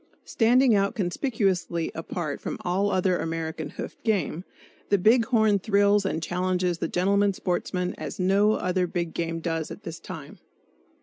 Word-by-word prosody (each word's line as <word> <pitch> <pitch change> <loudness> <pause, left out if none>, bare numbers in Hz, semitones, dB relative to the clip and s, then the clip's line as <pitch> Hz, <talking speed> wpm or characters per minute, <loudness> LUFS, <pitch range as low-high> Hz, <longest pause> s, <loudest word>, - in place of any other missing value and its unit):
Standing 245 +2 +4
out 200 +2 +2
conspicuously 190 - -1
apart 165 -2 -4
from - - -4
all 190 +3 0
other 185 -2 +1
American 160 -1 -3
hoofed - - -8
game, 185 -6 0 0.5
the 200 - +4
big 225 +5 +4
horn 220 -5 +3
thrills 200 0 +3
and 165 -3 -2
challenges 180 0 0
the - - -1
gentleman 200 +3 +2
sportsman 180 0 -2
as - - -6
no 200 +3 +3
other 180 -1 0
big 170 -1 -3
game 165 0 -3
does 165 -2 -2
at - - -9
this 165 -1 -7
time. - - -9
185 Hz, 150 wpm, -26 LUFS, 170-205 Hz, 0.5 s, Standing